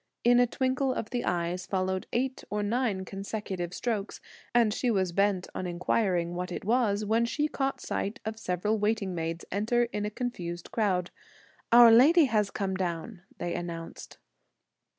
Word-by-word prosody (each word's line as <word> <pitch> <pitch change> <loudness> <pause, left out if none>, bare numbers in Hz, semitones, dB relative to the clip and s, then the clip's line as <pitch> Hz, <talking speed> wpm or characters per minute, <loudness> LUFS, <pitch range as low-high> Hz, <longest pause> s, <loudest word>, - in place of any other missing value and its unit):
In 245 +1 +5
a 245 - +5
twinkle 260 +2 0
of 225 - -4
the 245 -1 -1
eyes 175 +1 -2
followed 185 -1 -1
eight 260 +2 -1
or 210 0 -1
nine 210 -3 0
consecutive 195 -2 -5
strokes; 210 +1 -3 0.3
and 230 -3 +3
she 250 - 0
was 190 -5 +1
bent 195 0 +1
upon 185 - -5
inquiring 175 0 0
what 180 +1 -4
it 180 - -5
was, 215 -2 +2
when 225 +3 +2
she 295 +6 0
caught 270 -2 -2
sight 215 +7 -3
of 220 0 -4
several 210 +3 -1
waiting 210 -2 0
maids 165 0 -4
enter 220 +5 +1
in 210 - -2
a 210 - -1
confused 180 -8 -5
crowd. 185 -5 0 0.6
"Our 235 0 +9
lady 295 +8 +7
has 215 -5 +1
come 195 -1 -2
down!" 180 +2 -3 0.2
they 175 - -3
announced. 165 -1 -6
205 Hz, 165 wpm, -29 LUFS, 180-235 Hz, 0.6 s, Our